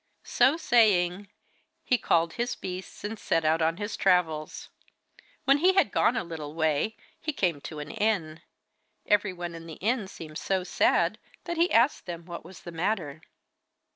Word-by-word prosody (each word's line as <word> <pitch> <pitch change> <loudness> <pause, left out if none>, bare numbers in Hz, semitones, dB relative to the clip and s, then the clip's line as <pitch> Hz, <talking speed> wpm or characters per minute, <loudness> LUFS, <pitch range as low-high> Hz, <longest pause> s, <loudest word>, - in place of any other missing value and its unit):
So 290 +5 +3
saying, 200 - +3 0.5
he 250 - +2
called 165 0 +2
his 240 +1 -2
beasts, 185 0 -7
and 210 +1 -4
set 165 - 0
out 160 +1 +3
on 165 +1 +1
his 205 +1 -4
travels. 165 -5 +1 0.8
When 275 +2 +5
he 365 +4 +5
had 375 - +3
gone 235 - +2
a - - -1
little 160 -3 -7
way 160 +6 0 0.2
he 310 - -2
came 175 - -1
to 155 - -8
an 150 0 -6
inn. 200 -8 -1 0.6
Everyone 185 -4 0
in 165 0 -9
the 160 - -8
inn 220 0 -1
seemed 155 -4 -8
so 190 -1 -1
sad - - +2 0.2
that 345 -1 -4
he 340 +2 +3
asked 235 0 +3
them 170 -1 -6
what 175 -1 -7
was 175 +2 -13
the 175 - -8
matter. 165 -4 -2
180 Hz, 170 wpm, -27 LUFS, 165-220 Hz, 0.8 s, When